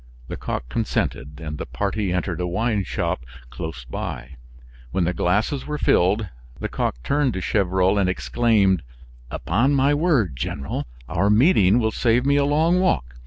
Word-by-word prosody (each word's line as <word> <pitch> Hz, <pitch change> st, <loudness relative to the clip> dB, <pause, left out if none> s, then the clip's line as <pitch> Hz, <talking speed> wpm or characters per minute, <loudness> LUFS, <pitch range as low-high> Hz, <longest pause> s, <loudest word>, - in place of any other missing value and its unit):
Lecoq -, -, -4 dB
consented, 70 Hz, +3 st, -2 dB
and 75 Hz, -2 st, -6 dB
the -, -, -4 dB
party 100 Hz, -1 st, -2 dB
entered 90 Hz, -1 st, -2 dB
a 90 Hz, -, -1 dB
wine 105 Hz, +3 st, 0 dB
shop 65 Hz, -, -2 dB, 0.3 s
close 80 Hz, -6 st, -6 dB
by. 65 Hz, +2 st, -6 dB, 0.5 s
When 90 Hz, +8 st, 0 dB
the 85 Hz, +2 st, 0 dB
glasses 105 Hz, +11 st, 0 dB
were 150 Hz, 0 st, -2 dB
filled, 100 Hz, -2 st, +2 dB, 0.3 s
Lecoq -, -, -2 dB
turned 140 Hz, -3 st, +1 dB
to 95 Hz, -, -3 dB
Gevrol 95 Hz, 0 st, +1 dB
and 95 Hz, -2 st, +2 dB
exclaimed: 100 Hz, -2 st, +2 dB, 0.5 s
"Upon 135 Hz, +6 st, +1 dB
my 140 Hz, +2 st, +3 dB
word, 145 Hz, -, +1 dB
General, 70 Hz, +2 st, -4 dB, 0.2 s
our 100 Hz, +4 st, +1 dB
meeting 105 Hz, -, +5 dB
will 110 Hz, -2 st, +1 dB
save 120 Hz, +3 st, +2 dB
me 140 Hz, 0 st, +3 dB
a 140 Hz, 0 st, +3 dB
long 160 Hz, +5 st, +3 dB
walk. 115 Hz, -, 0 dB
100 Hz, 155 wpm, -23 LUFS, 90-130 Hz, 0.5 s, meeting